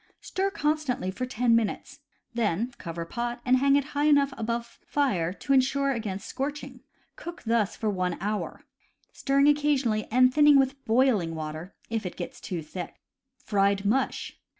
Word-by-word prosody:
Stir 390 +1 -1
constantly 300 - -1
for 255 +6 -4
ten 240 -1 +2
minutes. 230 -2 -2 0.3
Then 230 +1 0
cover 170 -1 -5
pot 240 +6 -4
and 255 0 +4
hang 275 +1 +4
it 285 - +3
high 290 +1 +1
enough 285 -2 +4
above 235 +1 -4
fire 195 - 0
to 275 +7 -1
insure 275 +1 +3
against 215 -5 -4
scorching. 290 +2 -5 0.4
Cook 345 +1 -9
thus 225 -3 +1
for 220 - -3
one 180 -3 -1
hour, 210 +2 -3 0.5
stirring 275 +1 +2
occasionally, 285 -7 +2
and 255 +2 +4
thinning 295 0 +6
with 270 -1 +3
hailing 220 -8 +2
water 155 +3 -6 0.2
if 225 -1 -1
it 175 - -8
gets - - -7
too 170 -4 -4
thick. 175 +3 -7 0.4
Fried 200 -1 +1
Mush. 255 +6 -1
240 Hz, 155 wpm, -27 LUFS, 200-275 Hz, 0.5 s, thinning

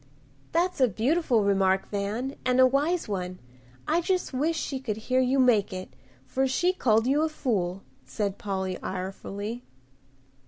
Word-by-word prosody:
"That's 345 -2 +1
a 255 - +6
beautiful 240 - +1
remark, 195 -1 +2
Van, 215 +7 -2
and 250 +1 +2
a 260 - +8
wise 295 +7 +1
one. 185 -3 -3 0.5
I 330 +3 +2
just 365 -3 -1
wish 310 +5 0
she 275 -3 -3
could 225 -5 -3
hear 255 +4 0
you 260 +1 +2
make 235 -5 +4
it, 185 -7 -7 0.3
for 265 - 0
she 355 +8 +2
called 225 -9 +2
you 280 +4 +3
a 320 - +1
fool," 195 - -2 0.2
said 205 -3 -3
Polly, 190 -2 -3
irefully. 195 +4 -5
240 Hz, 155 wpm, -27 LUFS, 200-275 Hz, 0.5 s, a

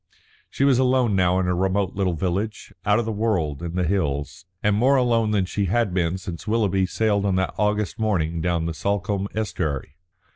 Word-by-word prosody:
She - - -1
was 135 -3 +4
alone 125 -4 +2
now 90 -1 +3
in 95 - +1
her 90 0 +1
remote 95 +1 0
little 95 -3 0
village, 95 +6 -3
out 105 0 +4
of 120 - 0
the 110 - -2
world 95 -9 -1
in 85 0 -5
the 90 - +1
hills, 80 -1 -2 0.2
and 105 0 +3
more 130 +6 +4
alone 120 -4 +2
than 100 -3 +1
she 100 +2 -1
had 100 +1 +1
been 90 0 0
since 90 0 -8
Willoughby 100 -4 +1
sailed 105 0 +1
on 100 -2 +1
that 95 0 0
August 105 -2 0
morning 85 -7 0
down 85 -1 0
the 85 - -2
Salcombe 100 +2 -1
estuary. 80 - -3
95 Hz, 195 wpm, -23 LUFS, 90-110 Hz, 0.2 s, was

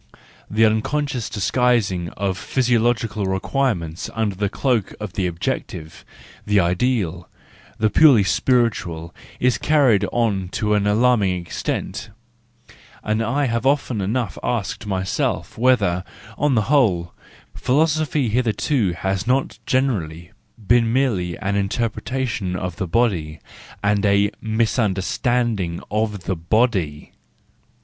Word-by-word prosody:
The 110 +2 +3
unconscious 125 +3 0
disguising 100 -4 +1
of 95 -1 -1
physio¬ 120 +4 +1
logical 115 -3 0
requirements 95 - -1
under 110 -3 0
the 100 +1 -1
cloak 120 -3 -1
of 105 -4 -6
the 95 -2 0
objective, 80 -1 -4 0.4
the 105 -1 +2
ideal, 90 -2 0 0.5
the 110 -1 +1
purely 135 -8 +6
spiritual, 95 -8 0 0.3
is 125 0 +2
carried 135 -10 +3
on 100 -6 0
to 105 -1 0
an 105 -1 +2
alarming 105 -4 +2
extent,—and 115 +4 -6
I 135 +6 0
have 115 0 0
often 135 -6 +1
enough 110 +1 -2
asked 110 -3 -3
myself, 95 -1 -2
whether, 105 -8 +2 0.3
on 145 -3 +1
the 110 - +3
whole, 95 -12 +2 0.4
philosophy 150 -1 +1
hitherto 110 -2 +1
has 95 +4 -2
not 130 +1 0
generally 90 -11 -1 0.3
been 115 +1 +3
merely 105 -10 0
an 100 - -2
interpreta¬ 115 +6 -1
tion 95 -5 -3
of 90 -2 -4
the 95 -2 -3
body, 85 -8 0 0.4
and 100 0 +2
a 100 0 +3
misunderstanding 110 -2 0
of 105 -2 -1
the 95 +1 -1
body. 85 -4 0
110 Hz, 115 wpm, -21 LUFS, 95-125 Hz, 0.5 s, purely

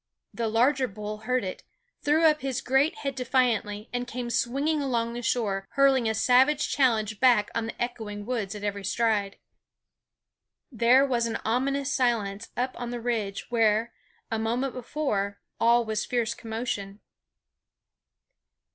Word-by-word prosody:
The 230 -1 -2
larger 255 +4 +2
bull 210 0 -6
heard 255 -2 +2
it, 185 -1 -5 0.4
threw 310 +3 +3
up 305 -1 +4
his 270 -1 -2
great 270 +5 +2
head 275 -1 -3
defiantly, 240 -5 0
and 245 0 -2
came 245 0 -4
swinging 280 +7 0
along 235 -4 -1
the 240 - -5
shore, 200 -5 -1
hurling 270 -4 +4
a 220 - -1
savage 265 +6 +3
challenge 220 -6 +1
back 240 -5 +4
on 230 -1 -2
the - - -8
echoing 220 -4 -4
woods 220 -5 -3
at 205 - -8
every 200 -1 -3
stride. 205 0 0 1.3
There 245 +3 +5
was 240 -3 0
an 230 - -2
ominous 275 +4 0
silence 230 -5 0
up 255 +1 0
on 240 - -3
the 240 0 -4
ridge 225 -3 -3
where, 225 0 +2 0.4
a 225 - 0
moment 240 +4 -1
before, 220 -6 -2 0.2
all 235 +1 +4
was 215 -1 -1
fierce 235 -2 -1
commotion. 220 -4 -5
235 Hz, 145 wpm, -27 LUFS, 215-255 Hz, 1.3 s, There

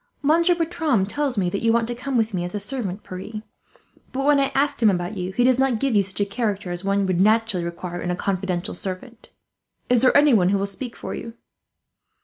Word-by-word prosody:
"Monsieur 335 +4 +4
Bertram 320 - 0
tells 275 +3 -2
me 185 -3 +1
you 225 +4 +1
want 230 0 +2
to 240 - -3
come 250 +2 -3
with 225 -1 +1
me 175 -2 -1
as 180 +3 -4
a - - -1
servant, 205 -5 -4
Pierre; 210 +4 -7 0.7
but 270 +1 -2
when 290 -1 +5
I 275 - +1
asked 280 -1 +1
him 220 - +6
about 180 +1 -1
you, 185 -1 -3
he 245 +6 +1
does 255 0 +4
not 265 -3 +2
give 270 -2 0
you 205 - +5
such 190 +1 -7
a - - +3
character 200 -3 -2
as 175 +1 -5
one 195 0 +1
would 185 -1 +1
naturally 215 -3 +2
require 175 +1 -5
in 180 - -3
a 180 - 0
confidential 185 -1 -2
servant. 195 +6 -7 0.6
Is 245 -2 +4
there 260 +2 +5
anyone 240 -11 +5
who 200 - +2
will 195 - -1
speak 230 +5 -6
for - - -6
you?" 230 0 -7
215 Hz, 225 wpm, -23 LUFS, 190-255 Hz, 0.7 s, him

